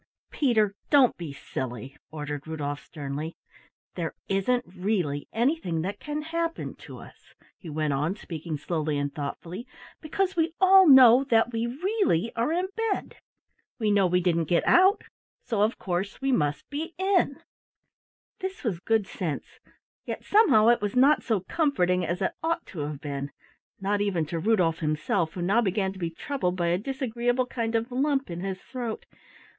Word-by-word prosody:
"Peter, 220 -8 +2 0.2
don't 275 -4 +5
be 170 -4 -6
silly," 130 -2 -6
ordered 150 -1 -6
Rudolf 145 -2 -4
sternly. 150 +1 -6 0.6
"There 165 -3 -4
isn't 245 +6 +1
really 180 -6 -2
anything 225 - 0
that 195 +3 -4
can 300 0 -4
happen 330 +1 -3
to - - -9
us," - - -15 0.2
he 170 - -9
went 155 -1 -1
on, 150 +7 0
speaking 165 -5 -6
slowly 155 -1 -2
and 145 0 -2
thoughtfully, 170 - -6 0.3
"because 380 +5 -1
we 330 0 0
all 380 0 +7
know 260 -2 +8
that 230 -2 +2
we 230 +1 -1
really 290 - 0
are 235 +6 0
in 360 +3 0
bed. 450 -3 -2 0.6
We 215 -3 +1
know 200 -2 +4
we 180 +1 +2
didn't 170 -2 +1
get 170 +3 +1
out, 380 +4 +5 0.4
so 220 -4 -1
of 215 +3 +2
course 185 +2 -3
we 270 0 0
must 150 - 0
be 315 +4 -4
in." 375 -7 +1 1.0
This 380 0 -5
was 205 -9 -1
good 220 +2 +1
sense, 165 -6 -5 0.4
yet - - -5
somehow 365 - +5
it 240 - +4
was 205 +1 -2
not 275 +4 +5
so 220 -6 0
comforting 185 - +1
as 175 +4 -2
it - - +1
ought 330 +1 -1
to 175 - -9
have 145 -1 -4
been, 140 -1 -4 0.5
not 200 +1 0
even 185 -6 0
to 165 +2 -4
Rudolf 180 -5 +2
himself 160 +2 0
who 175 - -4
now 205 +6 +3
began 190 -2 0
to 190 - -12
be 170 -2 -2
troubled 180 - -2
by 175 -2 0
a 175 +1 +1
disagreeable 245 0 -1
kind 230 -2 -3
of 230 +2 -1
lump 270 -3 0
in 170 - -5
his 190 0 -5
throat. 240 -4 -5
205 Hz, 170 wpm, -27 LUFS, 165-265 Hz, 1.0 s, know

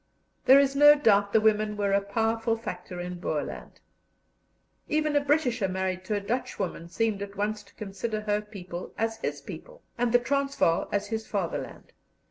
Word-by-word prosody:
There 265 - +8
is 275 0 +2
no 295 +1 +8
doubt 205 -8 +3
the 220 - +5
women 215 -1 +2
were 200 -1 0
a 200 0 +3
powerful 225 +3 0
factor 180 -5 -7
in 180 0 -5
Boerland. 150 -4 -4 1.1
Even 305 -1 +1
a 290 - +4
Britisher 265 -7 +1
married 185 0 -2
to 210 - -1
a - - 0
Dutchwoman 200 -6 -3
seemed 220 +1 -1
at 200 0 -6
once 210 +1 -1
to 205 - -22
consider 215 +2 -4
her 210 0 0
people 185 -4 -8
as 225 0 -1
his - - -4
people, - - -10 0.2
and 245 -1 +2
the 245 - +7
Transvaal 275 -7 +1
as 205 0 -1
his 220 -1 -3
fatherland. 195 -5 -4
215 Hz, 170 wpm, -27 LUFS, 200-240 Hz, 1.1 s, There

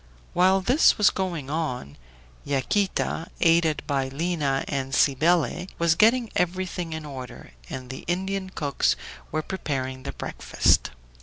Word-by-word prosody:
While 190 +2 +4
this 255 - +4
was 210 - +5
going 170 -7 -3
on, 125 - -3 0.5
Yaquita, 165 +4 0
aided 165 -2 +3
by 140 -2 0
Lina 145 -1 -1
and 135 -1 -2
Cybele, 165 +5 +2
was 170 -1 +3
getting 225 +5 +3
everything 180 -1 -1
in 160 -1 -5
order, 130 -4 -9 0.2
and 130 -1 -6
the 130 - -8
Indian 190 +2 -2
cooks 145 -6 0 0.4
were 155 0 -1
preparing 130 -8 -3
the - - -5
breakfast. - - +1
165 Hz, 130 wpm, -25 LUFS, 135-185 Hz, 0.5 s, was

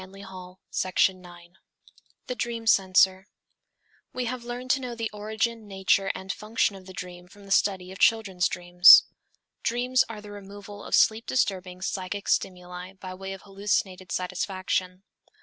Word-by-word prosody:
NINTH 185 +1 -14
LECTURE 185 -2 -11
THE 185 +1 +2
DREAM 175 -1 -15 0.7
The - - -3
Dream 230 -1 -4
Censor 190 -2 +4 0.8
We 250 -1 -3
have 245 0 -4
learned 245 +1 -3
to 280 - +2
know 245 -2 -5
the 230 -1 -3
origin, 220 +1 -3
nature 195 0 +1
and 190 0 -5
function 215 -1 -1
of 190 -1 -13
the 190 - -10
dream 180 -1 -8
from 200 +2 -16
the 195 - -12
study 190 -2 +1
of 190 - -10
children's 200 -6 +3
dreams. 175 0 +8 0.6
_Dreams 250 +2 +2
are 220 -2 -7
the 210 0 -11
removal 205 0 -10
of - - 0
sleep 220 +1 +3
disturbing 185 -6 -1
psychic 190 +1 -4
stimuli 180 0 -2
by 185 -1 -9
way 190 +1 -7
of 195 - -11
hallucinated 195 -2 -2
satisfaction. 185 0 -2
195 Hz, 155 wpm, -26 LUFS, 185-215 Hz, 0.8 s, dreams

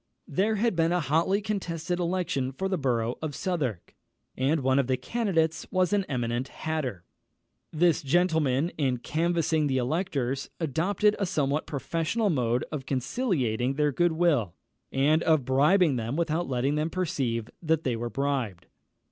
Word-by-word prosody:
There 215 +3 +1
had 225 -1 +1
been 165 0 +2
a 180 - +2
hotly 165 +7 +1
contested 175 -5 -2
election 170 -7 -1
for 190 +8 -2
the 190 -1 -1
borough 120 -3 0
of 155 -3 -4
Southwark, 135 - -3 0.4
and 140 +4 +1
one 130 +1 +3
of 135 - +1
the 130 -1 +1
candidates 165 - 0
was 185 0 +1
an 200 -2 +2
eminent 120 -1 -1
hatter. 135 - -4 0.7
This 165 0 +3
gentleman, 160 -1 +2
in 130 -4 +1
canvassing 160 +2 0
the 130 -2 0
electors, 135 -1 -1
adopted 180 +7 +1
a 200 - 0
somewhat 150 -4 0
professional 165 - -1
mode 125 -4 0
of 140 -4 -5
conciliating 130 - 0
their 150 0 +2
good 175 +4 +2
will, 150 - +1 0.4
and 150 +4 +3
of 155 -6 +2
bribing 150 +3 +4
them 115 +3 -3
without 170 0 -1
letting 130 +2 0
them 150 +2 0
perceive 130 -11 -2
that 160 -1 +1
they 125 -3 0
were 120 +1 -3
bribed. 125 -7 -2
155 Hz, 155 wpm, -27 LUFS, 130-175 Hz, 0.7 s, bribing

